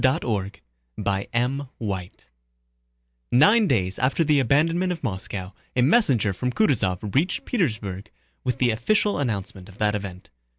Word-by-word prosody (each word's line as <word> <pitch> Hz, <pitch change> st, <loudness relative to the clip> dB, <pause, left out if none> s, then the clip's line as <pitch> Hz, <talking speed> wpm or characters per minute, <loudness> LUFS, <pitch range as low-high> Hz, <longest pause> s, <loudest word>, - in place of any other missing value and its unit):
CHAPTER 115 Hz, -, +1 dB, 0.5 s
III 110 Hz, -2 st, -2 dB, 1.2 s
Nine 205 Hz, -, +5 dB
days 95 Hz, -7 st, 0 dB
after 130 Hz, +6 st, +2 dB
the 150 Hz, -2 st, +3 dB
abandonment 165 Hz, +8 st, +2 dB
of 170 Hz, -, -5 dB
Moscow, 95 Hz, -3 st, -4 dB, 0.2 s
a 125 Hz, -, +3 dB
messenger 130 Hz, -, +3 dB
from 125 Hz, +7 st, -2 dB
Kutúzov 105 Hz, -, 0 dB
reached 170 Hz, +7 st, +1 dB
Petersburg 110 Hz, -, -2 dB, 0.3 s
with 125 Hz, -1 st, -1 dB
the 125 Hz, -2 st, +2 dB
official 205 Hz, -, +1 dB
announcement 100 Hz, -6 st, -3 dB
of 100 Hz, -, -15 dB
that 105 Hz, -1 st, +1 dB
event. 95 Hz, -3 st, -6 dB
120 Hz, 125 wpm, -24 LUFS, 100-145 Hz, 1.2 s, Nine